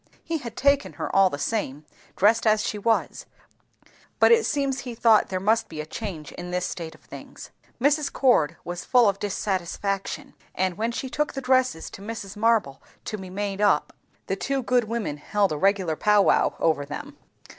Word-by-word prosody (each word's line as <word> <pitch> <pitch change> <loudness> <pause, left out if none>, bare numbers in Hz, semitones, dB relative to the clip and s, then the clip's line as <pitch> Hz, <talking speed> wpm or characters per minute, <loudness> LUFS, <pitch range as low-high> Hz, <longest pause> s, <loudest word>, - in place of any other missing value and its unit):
He 330 -1 -2
had 235 -4 -8
taken 280 0 +2
her, - - -5
all 195 -1 +6
the 145 - -5
same, 150 -6 -3 0.3
dressed 220 +3 +3
as 215 0 +3
she 210 - -3
was, 225 +2 0 0.9
but - - +6
it 460 -1 +5
seems 275 -2 0
he 245 -3 -6
thought 225 -2 +4
there 185 - -2
must 220 +4 +1
be 155 - -8
a 150 - -3
change 160 -3 -6
in 175 0 -8
this 180 0 -1
state 165 -3 -6
of - - -21
things. - - -11 0.3
Mrs. 285 +3 +2
Cord 170 - +2
was 175 0 -5
full 245 -3 +4
of 200 0 0
dissatisfaction; 195 -1 -3 0.2
and 185 -1 0
when 225 +4 -1
she 265 - -4
took 300 +3 -2
the - - -4
dresses 255 -8 +1
to - - -10
Mrs. 205 -2 -7
Marble 210 -10 +1 0.2
to - - -3
be 190 -1 -8
made 200 +1 -3
up, 200 -8 +2 0.3
the 195 - -1
two 270 +6 -2
good 245 -1 +2
women 215 -9 -3
held 200 +5 0
a 155 - -2
regular 190 -4 +2
pow 210 +4 +4
wow - - +3
over 160 -3 +1
them. 285 - -7
210 Hz, 190 wpm, -25 LUFS, 185-240 Hz, 0.9 s, all